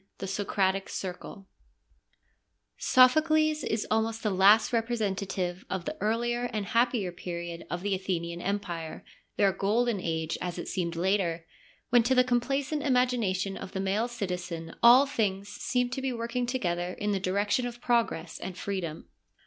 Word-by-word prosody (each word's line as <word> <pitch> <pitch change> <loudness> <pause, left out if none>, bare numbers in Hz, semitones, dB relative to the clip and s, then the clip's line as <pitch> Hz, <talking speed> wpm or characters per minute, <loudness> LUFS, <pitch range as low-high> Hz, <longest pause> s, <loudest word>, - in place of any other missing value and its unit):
— - - -51
The 195 - -5
Socratic 195 0 0
Circle 190 +1 -6 1.3
Sophocles 310 +4 +4
is 220 -1 -1
almost 225 +1 0
the 210 - +1
last 200 +5 +5
representative 200 -6 -1
of 185 -3 -3
the - - -3
earlier 240 +3 0
and 215 -3 -2
happier 230 -3 +1
period 170 -1 -6
of 175 +1 -4
the 205 -1 0
Athenian 175 -2 -3
Empire, 175 -5 -4 0.3
their 200 -1 +4
golden 210 +3 +1
age 160 -1 -2
as 180 -1 -3
it - - -5
seemed 170 -2 -2
later, 170 -2 0 0.5
when 240 -1 +7
to 250 +3 +2
the 250 - +6
complacent 275 +4 0
imagination 240 -8 +1
of - - -8
the 190 - -3
male 195 +4 0
citizen 180 -7 -5
all 245 +4 +8
things 205 -8 -1
seemed 250 +2 -1
to 265 - -3
be 265 0 -1
working 240 +1 -2
together 180 -8 -1
in 210 0 -2
the 195 - 0
direction 205 +6 0
of 240 0 -8
progress 230 -9 0
and 185 -1 -6
freedom. 180 -6 -4
205 Hz, 155 wpm, -28 LUFS, 185-240 Hz, 1.3 s, all